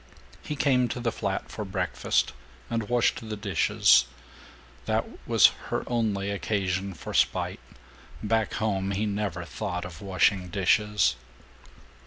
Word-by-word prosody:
He 150 - -5
came 130 -3 +3
to 120 - -4
the 120 -1 0
flat 100 -3 -3
for 110 - -4
breakfast, 95 - 0 0.4
and 115 -2 -2
washed 120 -1 +2
the 105 - -3
dishes. 95 -10 +4 0.8
That - - +1 0.2
was - - +6 0.2
her - - -1
only 105 -5 -1
occasion 95 -2 -1
for - - -8
spite. - - +1 0.6
Back 110 0 0
home 100 -3 -1
he 105 +3 0
never 100 -4 -2
thought 90 -2 -4
of 85 -3 -9
washing 95 -1 +2
dishes! 105 - +2
100 Hz, 130 wpm, -27 LUFS, 95-110 Hz, 0.8 s, was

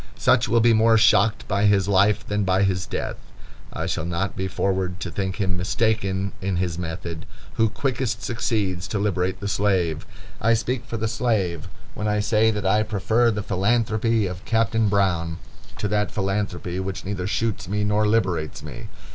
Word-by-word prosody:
Such 125 -1 +3
will 115 +1 +4
be 115 0 +5
more 110 +1 +5
shocked 110 -1 +3
by 100 +1 +1
his 100 -2 +3
life 100 +1 +3
than 105 0 -1
by 95 +1 +2
his 95 -1 0
death. - - -4 0.5
I - - -4
shall 80 - -2
not 90 +3 -2
be 95 - -2
forward 95 -1 -1
to - - -4
think 95 -1 -2
him 95 -3 -1
mistaken 100 0 0
in 95 -1 -1
his 90 -1 -1
method 85 -1 -5 0.3
who 110 -1 +2
quickest 120 -2 -2
succeeds 100 -7 -1
to - - -2
liberate 95 -2 0
the 100 - -3
slave. 95 -6 0 0.3
I 115 +2 +4
speak 120 +2 -2
for 115 - -4
the 110 +1 -1
slave 100 -7 -1 0.3
when 105 - -3
I 105 0 +1
say, 110 +1 +3
that 105 -2 -2
I 105 +3 +3
prefer 110 +2 +1
the 105 -2 -2
philanthropy 110 +2 +1
of 90 -1 -5
Captain 115 -1 +1
Brown 90 -5 +1 0.4
to 105 - -1
that 105 0 +1
philanthropy 95 -3 -2
which 95 0 -4
neither 95 -2 -3
shoots 110 -2 -1
me 105 +2 -1
nor 105 +1 +2
liberates 95 -8 0
me. - - -8
100 Hz, 180 wpm, -23 LUFS, 95-110 Hz, 0.5 s, be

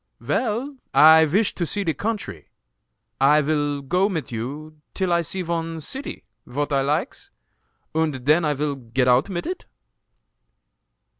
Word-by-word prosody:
"Vel, 255 +4 -2 0.2
I 160 +1 +8
vish 195 +8 +1
to 175 - -3
see 200 +5 -2
de 165 -4 0
country. 200 - -4 0.8
I 150 +1 +6
vil 145 -1 -1
go 180 +8 +1
mit 160 - -4
you 145 +7 -6 0.2
till 185 -2 0
I 170 - +3
see 185 +3 -3
von 165 -1 -3
ceety 265 - -6 0.2
vot 145 +4 -2
I 135 - +3
likes, 150 - -2 0.6
und 155 -5 -1
den 155 +4 +4
I 150 -1 +1
vil 145 +1 -1
get 125 -1 -1
out 125 +8 +4
mit 175 -3 -4
it!" 365 +2 -5
155 Hz, 150 wpm, -23 LUFS, 140-185 Hz, 0.8 s, I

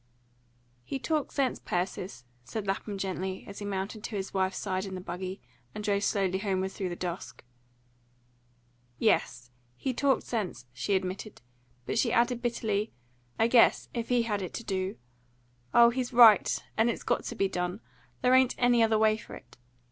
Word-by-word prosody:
"HE 270 - -4
talked 300 +2 -1
sense, 270 -3 0
Persis," 180 -6 -3 0.2
said 210 - -5
Lapham 195 +1 -2
gently, 190 0 -3
as 200 - -8
he 205 - -5
mounted 200 +2 -4
to 220 - -5
his 195 -1 -4
wife's 190 -1 0
side 190 -2 -2
in 190 -1 -6
the - - -5
buggy 185 +1 -5 0.4
and 210 - -5
drove 200 -1 +1
slowly 190 -3 +1
homeward 190 -2 -1
through 190 -2 -3
the 175 - -4
dusk. 170 -11 -6 1.5
"Yes, 125 - +1 0.2
he 260 - -2
talked 275 +2 +2
sense," 190 - -3
she 195 +11 0
admitted. 190 - -4 0.4
But 225 - -1
she 235 - +2
added 240 0 +2
bitterly, 220 -3 -1 0.5
"I 225 - +4
guess, 235 0 +4
if 235 -2 -3
he 245 -1 +3
had 210 -3 -1
it 185 - -5
to 230 - -5
DO! 190 -2 -2 0.8
Oh, 235 0 +7
he's 250 0 -2
right, 230 -3 +7 0.2
and 225 +2 +3
it's 235 - -3
got - - 0
to 240 - -5
be 195 -3 +2
done. 180 +1 -3 0.4
There 250 0 +5
ain't 260 -1 +5
any 245 -1 +4
other 220 -1 +4
way 215 0 +4
for - - -10
it. - - -15
205 Hz, 175 wpm, -29 LUFS, 190-235 Hz, 1.5 s, Oh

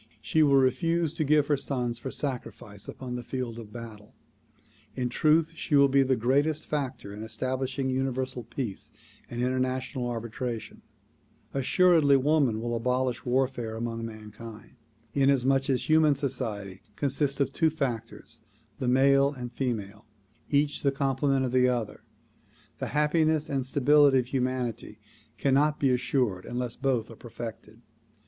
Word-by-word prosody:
She 155 +8 +1
will 145 -2 +5
refuse 150 +5 +2
to 165 -1 -1
give 150 0 +3
her 145 -1 +1
sons 125 -4 -2
for 130 - -5
sacrifice 115 -7 -6
upon 125 -2 -7
the 125 0 -4
field 120 -2 -4
of 110 -2 -10
battle. 110 -3 -10 0.8
In 125 -1 -1
truth 155 +5 +3
she 155 - -1
will 140 -1 +6
be 135 +1 +4
the 130 -1 +2
greatest 140 +6 +1
factor 130 -8 -4
in 105 - -8
establishing 130 +4 -2
Universal 130 -2 -2
Peace 115 -7 -5 0.4
and 120 0 -3
international 130 0 -1
arbitration. 115 0 -5 0.7
Assuredly 145 +1 +4
woman 135 -5 +2
will 120 +1 -3
abolish 125 +1 -1
warfare 125 -3 0
among 115 0 -4
mankind. 110 0 -10 0.4
Inasmuch 135 -1 +2
as 130 +2 0
human 155 -2 +5
society 105 -9 -4
consists 140 +1 -1
of 135 -1 0
two 160 +1 +3
factors, 120 -5 -5 0.4
the 130 - -2
male 140 +2 +4
and 125 -4 -7
female, 110 -5 -4 0.4
each 145 0 +1
the 140 - +2
complement 135 0 +1
of 125 - -2
the 125 0 +4
other, 115 -4 -3 0.8
the - - -2
happiness 155 +1 +2
and 135 -2 0
stability 140 +1 +4
of 125 -1 0
hu 130 -1 0
manity 125 -4 -3 0.4
cannot 145 +2 +2
be 135 -2 +3
assured 125 -6 0
unless 120 -1 -3
both 125 -5 -1
are - - -10
perfected. 115 -1 -9
130 Hz, 145 wpm, -28 LUFS, 120-140 Hz, 0.8 s, will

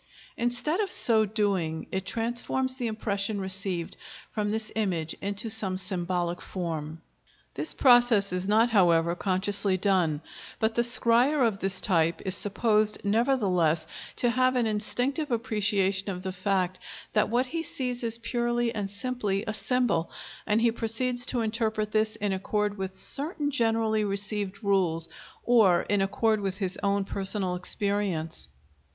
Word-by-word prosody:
Instead 245 - -1
of 400 -3 0
so 220 -2 +3
doing 195 -7 -1
it 190 0 -3
transforms 240 +3 -1
the 255 -2 -3
impression 205 -1 -2
received 190 -2 -4 0.4
from 210 -1 -1
this 215 0 -2
image 175 -7 -1
into 200 +3 -3
some 210 -4 -2
symbolic 180 -1 -2
form. 160 -3 -5 0.5
This - - -2
process 240 -7 +5
is 180 +1 -2
not, 225 +3 +4
however, 170 -5 +4
consciously 190 +1 +1
done, 180 -6 +1 0.4
but 220 0 +1
the 235 - +2
scryer 245 +3 +3
of 200 -3 -3
this 190 0 -1
type 170 -5 +2
is 190 0 +1
supposed 215 +1 +1
nevertheless 200 - +2 0.3
to 240 - +2
have 255 +1 +2
an 245 -2 +2
instinctive 245 +8 -1
appreciation 205 -5 0
of 180 -1 -5
the 190 -1 -3
fact 185 -1 0 0.3
that 210 - +2
what 245 +3 +2
he 325 +6 -3
sees 250 -6 -4
is 230 0 0
purely 240 0 -1
and 205 -3 -3
simply 205 -2 -2
a 215 - -2
symbol, 235 -8 +1 0.4
and 215 +1 +2
he 235 0 +4
proceeds 245 +2 -1
to 245 - +1
interpret 220 -1 -1
this 215 0 +1
in 205 -1 -1
accord 205 +2 -1
with 190 -1 -5
certain 290 - -2
generally 225 -4 +1
received 200 0 -3
rules, 180 -5 +1 0.4
or 215 -8 +5
in 205 -1 +1
accord 215 +3 +1
with 195 -1 -2
his 190 -2 -2
own 200 0 +1
personal 195 -1 -2
experience. 180 - -2
210 Hz, 145 wpm, -27 LUFS, 190-230 Hz, 0.5 s, process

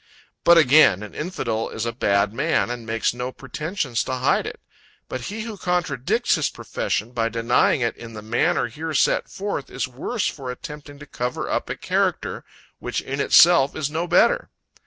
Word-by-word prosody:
But 170 0 +7
again, 145 - +6
an 105 - -9
infidel 150 -9 -3
is 115 - -4
a 115 - -1
bad 100 -3 +1
man, 155 -1 +1
and 120 -2 -6
makes 115 +1 0
no 125 +1 -4
pretensions 150 - -3
to 130 - -2
hide 130 0 +1
it. - - -7 0.5
But 130 - -5
he 210 - -5
who 220 -2 -6
contradicts 175 -8 0
his - - +1
profession, 105 +3 -3
by 115 -2 0
denying 115 +3 +2
it 115 -1 0
in 115 -1 -10
the 105 - -8
manner 110 +2 +1
here 155 +7 -5
set - - +2
forth, 200 -8 -4
is 130 - -3
worse 140 - -3
for 135 -3 -4
attempting 145 +3 -8
to 145 - -11
cover 125 -3 -4
up - - -2
a - - -2
character, - - -1 0.4
which - - -3
in 135 +1 -5
itself 160 -1 +6
is 150 -2 -2
no 165 +3 -2
better. - - +3
130 Hz, 180 wpm, -23 LUFS, 115-160 Hz, 0.5 s, But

